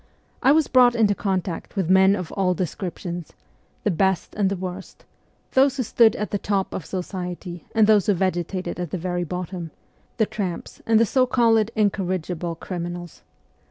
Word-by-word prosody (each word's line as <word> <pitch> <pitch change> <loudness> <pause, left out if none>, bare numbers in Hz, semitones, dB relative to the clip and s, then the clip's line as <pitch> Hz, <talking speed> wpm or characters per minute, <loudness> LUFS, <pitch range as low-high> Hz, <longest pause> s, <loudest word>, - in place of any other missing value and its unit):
I 265 - +5
was 310 +1 +4
brought 250 -2 +5
into 215 -3 +3
contact 190 -4 -3
with 190 -5 0
men 190 +1 +6
of 180 -5 -5
all 185 -2 +1
descriptions: 175 -1 -5 0.5
the 210 - +2
best 190 +1 0
and 200 -2 +1
the 200 - -1
worst; 185 +1 -7 0.5
those 270 +1 +3
who 255 - 0
stood 230 0 +4
at 210 - -4
the 205 - -1
top 195 -1 -1
of 175 - -5
society 180 -1 -5
and 220 -1 +6
those 210 -3 +4
who 205 - +4
vegetated 180 0 -2
at 175 -2 -3
the 185 - -3
very 175 0 -2
bottom 180 0 -5 0.5
the 220 - +3
tramps 190 -5 -5
and 225 -1 +5
the 230 - +5
so 255 +3 +2
called 225 -3 +3
incorrigible 180 -5 -1
criminals. 175 0 -6
190 Hz, 170 wpm, -23 LUFS, 175-210 Hz, 0.5 s, men